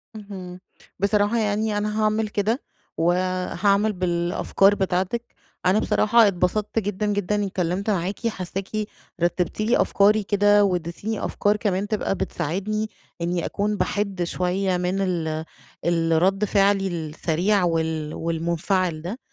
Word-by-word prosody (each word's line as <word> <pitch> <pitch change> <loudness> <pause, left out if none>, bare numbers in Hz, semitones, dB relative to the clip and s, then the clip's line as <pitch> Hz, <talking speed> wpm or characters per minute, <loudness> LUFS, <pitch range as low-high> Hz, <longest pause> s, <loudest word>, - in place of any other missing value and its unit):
اهم، 190 -4 -8 0.4
بصراحة 205 +3 +2
يعني 215 -1 0
أنا 210 +1 -1
هاعمل 215 +1 +1
كده 215 +5 0 0.4
وهاعمل 185 +4 +1
بالأفكار 180 +2 +2
بتاعتِك، 190 +5 -2 0.3
أنا 185 +4 +4
بصراحة 225 +1 +4
اتبسطت 200 +4 0
جدًا 205 0 -2
جدًا 205 -1 0
إني 205 -1 0
اتكلمت 185 +2 -2
معاكِ، 195 +4 -1
حاساكِ 190 -2 -4 0.5
رتبتِ 175 +3 0
لي 225 +3 +3
أفكاري 210 +2 +3
كده 205 +1 +4
واديتيني 185 +3 -2
أفكار 205 +1 +1
كمان 205 -2 -1
تبقى 210 -2 -1
بتساعدني 195 +6 -2 0.3
إني 170 0 -1
أكون 210 +1 -1
بَحِد 195 -1 -1
شوية 180 +2 0
من 180 +2 -1
ال 160 -4 -1 0.4
الرد 170 +4 +2
فعلي 195 -1 +3
السريع 170 +3 0
وال 160 -2 -1
والمنفعل 170 +1 -1
ده، 190 +10 -5
195 Hz, 120 wpm, -24 LUFS, 175-210 Hz, 0.5 s, أنا